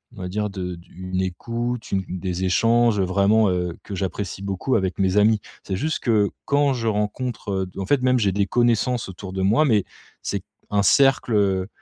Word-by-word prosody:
on 95 Hz, -, -9 dB
va 90 Hz, -, -4 dB
dire 105 Hz, +2 st, -2 dB
de 90 Hz, -2 st, -5 dB, 0.2 s
une 95 Hz, 0 st, -3 dB
écoute, 115 Hz, +6 st, -3 dB
une 95 Hz, -1 st, +1 dB, 0.2 s
des 90 Hz, 0 st, -3 dB
échanges, 115 Hz, +3 st, +3 dB
vraiment, 100 Hz, +3 st, +3 dB
heu, 90 Hz, -2 st, -2 dB
que 100 Hz, -, -6 dB
j'apprécie 95 Hz, +1 st, -4 dB
beaucoup 100 Hz, +7 st, -1 dB
avec 95 Hz, -2 st, -1 dB
mes 95 Hz, 0 st, +2 dB
amis. 105 Hz, +1 st, +4 dB, 0.2 s
C'est 95 Hz, -, -3 dB
juste 155 Hz, +7 st, -1 dB
que 105 Hz, -4 st, +2 dB, 0.2 s
quand 140 Hz, -1 st, +2 dB
je 115 Hz, -2 st, -3 dB
rencontre 105 Hz, -2 st, -2 dB
en 95 Hz, -, -3 dB
fait 135 Hz, +4 st, +2 dB
même, 130 Hz, 0 st, +3 dB
j'ai 100 Hz, -4 st, +2 dB
des 100 Hz, 0 st, +1 dB
connaissances 120 Hz, 0 st, +1 dB
autour 95 Hz, +1 st, -8 dB
de 95 Hz, -, -2 dB
moi, 110 Hz, +10 st, +4 dB
mais 110 Hz, -7 st, +3 dB, 0.4 s
c'est -, -, -3 dB, 0.3 s
un 100 Hz, -1 st, +2 dB
cercle 100 Hz, -7 st, +3 dB
100 Hz, 185 wpm, -23 LUFS, 95-115 Hz, 0.4 s, amis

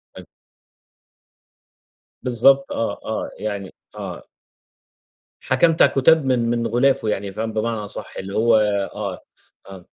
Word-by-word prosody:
حلو. -, -, -11 dB, 2.0 s
بالضبط، 135 Hz, +3 st, +3 dB
آه، 115 Hz, -, -2 dB
آه، 110 Hz, -, -3 dB
يعني 100 Hz, -3 st, -5 dB, 0.2 s
آه. -, -, -7 dB, 1.2 s
حكمت 160 Hz, +5 st, +2 dB
على -, -, +7 dB
الكتاب 145 Hz, +2 st, +4 dB
من 120 Hz, -3 st, +1 dB
من 120 Hz, -1 st, 0 dB
غلافه 125 Hz, -1 st, +2 dB
يعني، 100 Hz, -1 st, -2 dB
فاهم؟ 110 Hz, +2 st, -4 dB
بمعنى 115 Hz, +1 st, -1 dB
أصح 100 Hz, -, -7 dB
اللي 95 Hz, +1 st, -6 dB
هو 115 Hz, 0 st, +4 dB, 0.4 s
آه، 100 Hz, -4 st, -5 dB, 0.4 s
آه. 95 Hz, -2 st, -11 dB
115 Hz, 120 wpm, -21 LUFS, 105-130 Hz, 2.0 s, على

